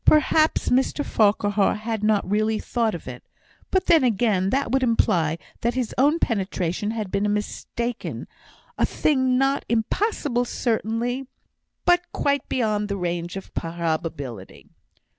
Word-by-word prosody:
Perhaps 310 +1 +3
Mr 265 +3 +1
Farquhar 205 -1 +2
had 215 0 -4
not 210 -1 +2
really 215 +2 +1
thought 225 -2 -1
of 165 - -9
it; 125 -1 -8 0.5
but 375 - +1
then 325 -4 +5
again, 210 -5 +2
that 270 +2 0
would 265 +1 +2
imply 170 -10 +2 0.2
that 235 +1 -1
his 255 -3 -2
own 290 +5 +3
penetration 195 - -1
had 215 -4 -3
been 205 +1 +1
mistaken, 235 +3 -4 0.5
a - - +4
thing 260 -4 +2
not 270 +1 +1
impossible 245 - 0
certainly, 240 +2 -1 0.6
but 350 0 +5
quite 280 0 0
beyond 210 -4 0
the 200 - -2
range 175 0 -3
of 195 - -10
probability. 160 - -4
220 Hz, 135 wpm, -24 LUFS, 195-255 Hz, 0.6 s, then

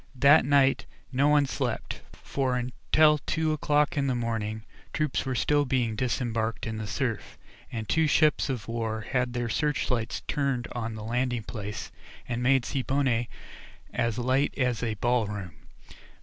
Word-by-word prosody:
That 140 +4 +6
night 140 -1 +3 0.2
no 135 +2 +3
one 150 -1 +4
slept, 130 -4 -3
for 130 -2 -2
until 150 +5 +3
two 155 +2 -1
o'clock 150 0 +1
in 140 -2 +1
the 130 - +1
morning, 110 -2 -2 0.3
troops 150 -4 -1
were 130 - -1
still 145 +4 +2
being 125 -5 0
disembarked 115 -2 -1
in 110 0 -3
the 110 -1 -4
surf, 115 +2 -3 0.3
and 110 -3 -4
two 160 -1 +2
ships 150 -1 +3
of 120 -6 -3
war 115 -1 -2
had 125 +2 -1
their 120 -1 -1
searchlights 125 -4 -1
turned 135 -4 -1
on 115 -2 -4
the 110 - -7
landing 120 +1 -1
place, 105 -2 -6 0.4
and 120 0 -2
made 130 0 +3
Siboney 130 -3 0 0.6
as 115 -3 0
light 130 +3 +1
as 125 -4 0
a 115 -3 -1
ball 120 +1 +1
room. 100 -5 -6
125 Hz, 155 wpm, -27 LUFS, 115-140 Hz, 0.6 s, That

